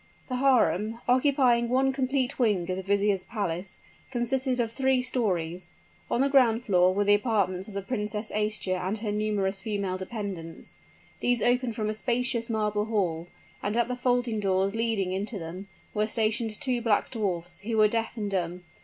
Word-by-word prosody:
The 255 - -1
harem, 230 -5 +2
occupying 250 -2 +3
one 265 +2 +2
complete 265 0 -1
wing 205 -8 +2
of - - -1
the 190 - -4
vizier's 200 0 +1
palace, 190 -4 -3 0.3
consisted 255 +1 0
of 230 -2 0
three 265 +1 +2
stories. 180 -8 -1 0.4
On 240 - +1
the 275 - +4
ground 245 -4 +4
floor 180 -3 +4
were 200 +2 +1
the 205 0 +4
apartments 200 -4 +1
of 210 - -10
the 200 - -3
Princess 210 -1 -2
Aischa 210 -3 -1
and 190 +4 -2
her 210 -1 -3
numerous 205 -2 -1
female 200 -3 -2
dependents. 185 -5 -6 0.4
These 245 -3 +1
opened 245 -1 +2
from 215 -1 -2
a 215 - 0
spacious 240 +1 -1
marble 210 -2 0
hall; 180 -7 -1 0.3
and 210 +3 -1
at 235 - +2
the 250 - -1
folding 245 -3 0
doors 195 0 +1
leading 225 -5 0
into 200 +4 -3
them, 180 +3 -7 0.3
were 210 0 +1
stationed 220 0 0
two 255 -5 0
black 225 -3 +1
dwarfs, 175 -6 -3
who 225 +2 -3
were 215 0 +6
deaf 225 +2 -2
and 205 -2 -3
dumb. 180 -1 -2
215 Hz, 175 wpm, -27 LUFS, 195-240 Hz, 0.4 s, were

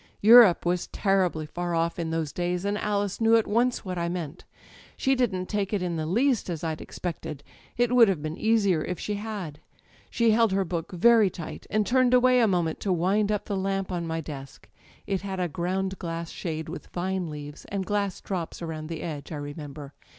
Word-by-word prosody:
"Europe 220 -5 +8
was 175 0 0
terribly 185 -6 +1
far 175 +2 -3
off 165 +1 0
in 165 -1 -2
those 160 -2 -2
days, 180 +1 -2
and 200 +1 0
Alice 205 0 -1
knew 225 0 +5
at 225 - +3
once 235 +2 +1
what 180 -2 -3
I 170 0 -1
meant. 170 -4 -5 0.5
She 265 - +2
didn't 210 -8 0
take 205 0 -2
it 200 -3 0
in 175 -2 -2
the 155 -1 -2
least 235 - +1
as 170 -2 -4
I'd 160 -1 -3
expected 155 -4 -6 0.3
â€" 240 - +4
^it - - -8
would 245 -2 +7
have 190 -5 +1
been 155 +1 -4
easier 200 -7 +2
if 180 - -4
she 210 - -3
had. 200 -8 -5 0.5
She 230 -1 +3
held 225 -2 +3
her 195 0 +1
book 165 -1 -4
very 220 +3 +5
tight, 170 -3 -8
and 215 -1 +1
turned 255 +1 +4
away 250 0 +5
a 230 - +4
moment 175 -5 0
to 200 - -1
wind 195 +4 +2
up 210 -1 -1
the 205 - -2
lamp 195 0 -1
on 170 -2 -2
my 165 0 -2
desk 140 -3 -9
â€" - - -28
it 195 -2 -1
had 190 -1 -4
a 180 - +1
ground 190 +4 -2
glass 165 -1 -4
shade 160 -2 -4
with 170 - -7
vine 180 -1 -2
leaves, 150 0 -8
and 195 -1 -3
glass 200 -1 -1
drops 180 -4 -4
around 160 -2 -5
the 165 -2 -5
edge, 150 -3 -6
I - - -3
remember. 145 -1 -7
185 Hz, 215 wpm, -26 LUFS, 165-205 Hz, 0.5 s, Europe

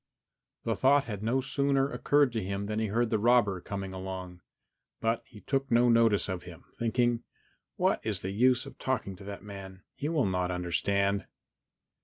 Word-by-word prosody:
The 115 - 0
thought 135 +5 +4
had 105 -7 -6
no 120 +5 +1
sooner 135 0 +1
occurred 145 -3 +3
to 110 - -1
him 100 +1 -3
than 105 +1 -2
he 110 - 0
heard 115 +3 0
the 110 - +2
robber 105 -5 +3
come 100 +1 -4
along, 95 -1 -6 0.6
but 115 +1 0
he 105 -3 -14
took 135 0 -1
no 120 +1 +4
notice 115 -3 +4
of 95 -2 -3
him, 85 -1 -12
thinking, 120 0 +1 0.5
"What - - +2
is - - -2
the 95 - -3
use 125 +4 +3
of - - -12
talking 125 -7 -2
to 100 - -12
that 100 0 -7
man? 95 -2 -9
He 145 - -3
will 155 -5 +2
not 90 -2 0
understand." 100 +3 0
105 Hz, 180 wpm, -30 LUFS, 95-125 Hz, 0.6 s, thought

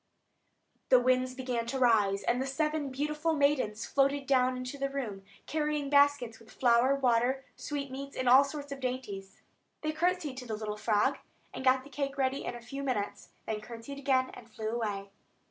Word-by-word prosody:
The 255 - +7
winds 255 +1 +2
began 250 -3 -2
to 270 - -2
rise, 210 -6 +3
and 245 +2 +1
the 265 - -2
seven 300 +1 -1
beautiful 300 +4 -1
maidens 280 -7 +1
floated 275 0 +1
down 255 -1 +3
into 255 +2 -6
the 275 0 0
room, 240 -8 -4 0.2
carrying 300 -2 -1
baskets, 285 -5 +4
with 225 -1 -18
flour, 245 +3 +3
water, 255 0 +2
sweetmeats, 275 -1 -5
and 255 - -1
all 260 +3 +8
sorts 285 0 -6
of 275 - -5
dainties. 230 -7 -5 0.4
They 310 - -1
curtsied 325 -3 0
to 250 -1 -7
the 220 - -2
little 210 -1 -4
frog, 210 -1 +1 0.3
and - - -6
got 260 0 +4
the 285 - -14
cake 275 0 -3
ready 265 0 0
in - - -3
a 240 - -8
few 275 +4 -6
minutes; 245 -7 -3 0.3
curtsied 235 +5 -8
again, 260 -2 +2
and 235 - -12
flew 215 0 -4
away. 205 -4 -3
260 Hz, 180 wpm, -31 LUFS, 235-280 Hz, 0.4 s, all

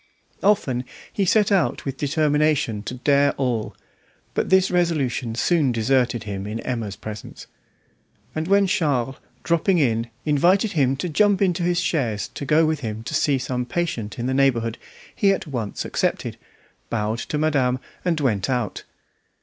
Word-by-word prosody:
Often 135 -12 +2 0.3
he 200 - +1
set 210 +2 +3
out 195 -3 +1
with 135 -1 -4
the 145 - 0
determination 150 -6 +1
to 125 - -6
dare 140 +2 +3
all; 120 -5 -2 0.6
but - - -1
this 190 0 +4
resolution 145 -10 0
soon 150 +1 +2
deserted 120 0 +1
him 100 -1 -5
in 110 +2 -4
Emma's 115 -6 -3
presence, 110 -1 -8 0.9
and 155 +1 -3
when 200 +1 +4
Charles, 140 -8 0 0.3
dropping 170 +3 +2
in, 115 -6 +1 0.2
invited 180 +8 +3
him 135 -4 +2
to 180 - -2
jump 200 +4 +3
into 180 -3 +1
his 175 0 +1
chaise 130 - -1
to 140 - -7
go 155 +3 +4
with 155 -1 0
him 110 -4 -5
to - - -6
see 140 -2 +2
some 125 -1 -2
patient 125 -6 -3
in 120 - -3
the 130 - 0
neighbourhood, 120 -4 +1 0.4
he 200 - +3
at - - -4
once 120 -9 -4
accepted, - - -1 0.5
bowed 110 0 -1
to 150 - -3
madame, 140 -5 +2 0.3
and 170 -3 0
went 110 -5 0
out. 120 -5 -2
135 Hz, 160 wpm, -23 LUFS, 120-170 Hz, 0.9 s, this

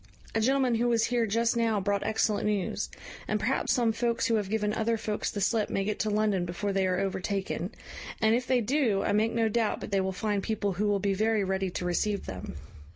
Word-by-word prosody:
A 225 - +1
gentleman 260 +1 +2
who 235 +1 +1
was 230 -2 +3
here 240 -2 +1
just 230 +3 +1
now 225 -3 +2
brought 200 +1 0
excellent 215 -1 +1
news; 205 -3 -1 0.4
and - - 0
perhaps - - +1
some 235 -3 +2
folks 230 0 0
who 230 - +1
have 205 -3 -2
given 210 -1 0
other 225 +1 0
folks 215 -1 -2
the 205 - -4
slip 215 +2 +1
may 195 - 0
get 210 +1 -2
to 215 - 0
London 210 -3 +1
before 180 +4 -3
they 190 -1 +2
are 180 0 0
overtaken; 195 0 -2 0.5
and 220 -1 +3
if 245 +1 0
they 255 -1 +3
do, 230 -4 +1
I - - 0
make 215 +2 +2
no 230 -1 +2
doubt 220 0 0
but - - -7
they 195 -1 +2
will 190 0 -1
find 205 +1 -1
people 205 -2 -1
who 205 +4 0
will 205 -1 +2
be 200 0 +1
very 215 +1 +1
ready 190 0 -1
to 180 - -4
receive 200 +3 0
them." 95 -1 -7
210 Hz, 230 wpm, -28 LUFS, 195-230 Hz, 0.5 s, was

